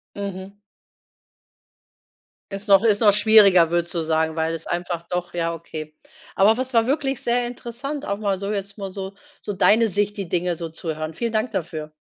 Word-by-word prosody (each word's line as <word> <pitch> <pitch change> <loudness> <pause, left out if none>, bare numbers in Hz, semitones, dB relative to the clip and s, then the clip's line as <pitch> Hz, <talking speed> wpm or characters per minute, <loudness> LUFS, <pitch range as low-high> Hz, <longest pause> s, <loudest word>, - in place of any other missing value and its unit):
Mhm. 200 0 -6 1.9
Ist 200 +2 -6
noch 195 -1 +7
ist 210 -1 +3
noch 210 -2 +7
schwieriger 205 -5 +6
würdest 170 0 0
du 170 - -1
sagen 160 0 0
weil 160 0 0
es 165 -1 -7
einfach 175 -1 -3
doch 180 0 -3
ja 170 -1 -1
okay. 155 -2 -8 0.4
Aber 210 +3 +5
was 260 +2 -4
war 230 -1 +3
wirklich 275 -1 -1
sehr 240 +1 +1
interessant, 245 +4 -6
auch 200 - -2
mal 200 -3 -1
so 200 +2 -3
jetzt 200 0 -5
mal 195 -2 -5
so 190 +1 -7 0.3
so - - -4
deine 215 +3 +4
Sicht, 205 +1 0
die 195 -4 -5
Dinge 175 0 0
so 165 0 -6
zuhören. 155 -1 -5
Vielen 230 +7 -3
Dank 220 +3 0
dafür. 155 -4 -4
195 Hz, 185 wpm, -22 LUFS, 170-220 Hz, 1.9 s, noch